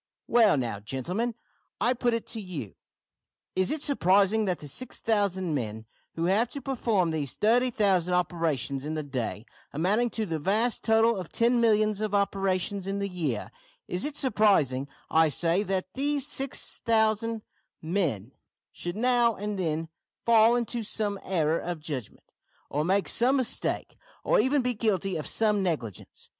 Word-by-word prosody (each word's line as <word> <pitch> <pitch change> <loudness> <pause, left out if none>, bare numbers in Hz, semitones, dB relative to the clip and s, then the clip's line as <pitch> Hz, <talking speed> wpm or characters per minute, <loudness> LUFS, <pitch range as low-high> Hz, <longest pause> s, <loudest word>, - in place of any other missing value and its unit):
"Well, 225 -9 +4
now, 115 -6 -2
gentlemen, 175 - -3 0.4
I 240 +5 +3
put 240 -1 0
it 230 - -4
to 225 - -4
you, 155 - -6 0.8
is 185 0 +1
it 305 -1 -2
surprising 205 -4 +3
that 180 -3 0
the 145 - -9
6000 200 - -1
men 110 -5 -3 0.3
who 165 - -1
have 210 +6 +2
to 280 - -4
perform 230 -10 0
these 145 -5 -2
30,000 210 -6 +2
operations 165 -7 -1
in 155 +2 -3
the 155 - -2
day 125 -5 -4 0.3
amounting 205 +10 +1
to 220 -1 -2
the 165 -4 -3
vast 215 +9 +1
total 225 +1 +4
of 180 -4 -6
ten 235 +1 +2
millions 215 -2 +3
of 210 -1 -1
operations 195 -1 0
in 195 +1 -2
the 200 0 -1
year 155 - -3 0.4
is 180 +2 -1
it 295 0 -3
surprising, 195 - +2 0.2
I 160 0 +5
say, 170 +5 +1
that 190 -2 -2
these 285 0 0
6000 230 -5 0 0.4
men 160 - -2 0.4
should 175 +3 -6
now 240 -1 +3
and 205 0 -4
then 165 -2 -1 0.4
fall 230 0 +6
into 240 0 -1
some 205 -2 -2
error 165 -3 +1
of 175 -2 -4
judgment, 145 -7 -7 0.5
or 150 +2 0
make 190 +4 +1
some 250 +3 +3
mistake, 255 -3 -1 0.2
or - - +3
even 260 +4 +2
be 250 0 0
guilty 195 -4 0
of 155 - -3
some 210 -2 +2
negligence? 150 - -4
195 Hz, 155 wpm, -27 LUFS, 160-230 Hz, 0.8 s, fall